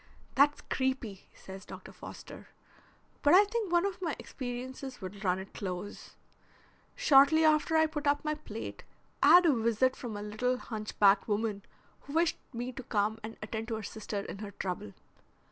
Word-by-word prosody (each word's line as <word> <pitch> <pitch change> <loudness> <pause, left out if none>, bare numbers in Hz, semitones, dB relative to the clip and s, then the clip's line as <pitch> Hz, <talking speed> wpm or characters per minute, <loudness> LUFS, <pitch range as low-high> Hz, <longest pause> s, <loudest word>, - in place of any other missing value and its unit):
"That's 290 +2 +4
creepy," 260 -7 -3
says 190 0 -10
Dr. - - -10
Foster. - - -11 0.7
"But 295 +3 +6
I 395 - +9
think 430 -3 -2
one 345 +1 +3
of 385 -2 -3
my 325 -6 -1
experiences 255 +1 -6
would 195 +1 -8
run 180 -1 +2
it 190 +1 -9
close. 185 +1 -6 0.8
Shortly 315 - +6
after 310 +1 +3
I 315 - +5
put 295 -2 -3
up 290 +1 +2
my 305 - +1
plate 225 -8 -7 0.4
I 295 - +7
had 355 0 +7
a 315 - +5
visit 235 +2 +2
from 225 -4 -6
a 205 - -5
little 245 +5 -1
hunch 215 -3 -6
backed 200 -1 +5
woman 210 -1 -1 0.4
who 280 - -11
wished 330 +1 +2
me 245 +1 -4
to 255 - -7
come 215 -1 0
and 225 +1 -8
attend 220 +1 -4
to 230 - -2
her 220 - -5
sister 205 -1 -4
in 200 - -8
her 210 -1 -6
trouble. 180 - -5
245 Hz, 180 wpm, -31 LUFS, 210-295 Hz, 0.8 s, I